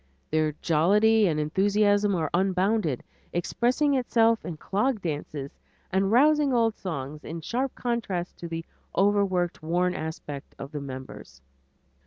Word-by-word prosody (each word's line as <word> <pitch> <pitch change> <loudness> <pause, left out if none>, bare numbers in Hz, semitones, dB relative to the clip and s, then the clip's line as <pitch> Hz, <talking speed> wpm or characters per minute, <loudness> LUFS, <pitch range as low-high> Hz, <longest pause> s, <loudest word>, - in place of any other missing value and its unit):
Their 155 -1 +1
jollity 205 +7 +4
and 155 -3 0
enthusiasm 205 +5 +2
are 160 -4 -1
unbounded, 190 - +1 0.3
expressing 245 - +1
itself 230 -3 +2
in 165 -3 -6
clog 215 - 0
dances 145 -4 -4 0.4
and 195 +1 +1
rousing 295 +3 +4
old 230 -2 +2
songs 150 -5 -5
often - - -11
in 165 +1 -5
sharp 255 +9 -2
contrast 215 -8 -2
to 170 - -5
the 165 0 -5 0.3
overworked, 195 -3 +2
worn 175 +3 +1
aspects 150 -4 -6
of 140 - -8
the 150 -2 -5
members. 130 - -9
185 Hz, 135 wpm, -26 LUFS, 155-220 Hz, 0.4 s, jollity